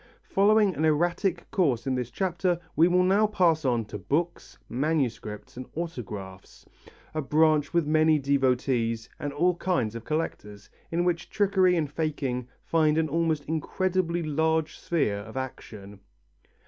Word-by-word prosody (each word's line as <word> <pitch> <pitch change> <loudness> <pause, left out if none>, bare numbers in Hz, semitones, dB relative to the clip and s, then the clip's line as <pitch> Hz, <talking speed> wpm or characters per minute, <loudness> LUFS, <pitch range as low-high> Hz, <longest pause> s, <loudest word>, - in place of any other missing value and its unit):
Following 205 0 +3
an 155 - -3
erratic 175 +4 +1
course 135 - +1
in 135 - 0
this 125 -2 -2
chapter, 175 +5 -1 0.2
we 165 +2 +5
will 180 +1 +3
now 200 +4 +4
pass 170 -6 +2
on 120 -3 +1
to 105 0 -7
books, 160 - -2
manuscripts 125 -7 -2
and 130 - -7
autographs, 105 - -7 0.5
a 155 - -1
branch 150 +1 +2
with 170 -2 +2
many 155 +1 +4
devotees 125 -4 0
and 145 - -3
all 175 +6 +2
kinds 150 - 0
of 115 -1 -7
collectors, 105 -9 -4 0.2
in 170 +1 0
which 175 -2 -1
trickery 190 -3 +3
and 160 -3 0
faking 145 -6 -2 0.2
find 155 -2 +2
an 160 -1 +1
almost 160 -1 0
incredibly 175 +2 -1
large 160 +1 0
sphere 145 -12 0
of 110 +5 -9
action. 105 -6 -7
155 Hz, 145 wpm, -27 LUFS, 125-170 Hz, 0.5 s, we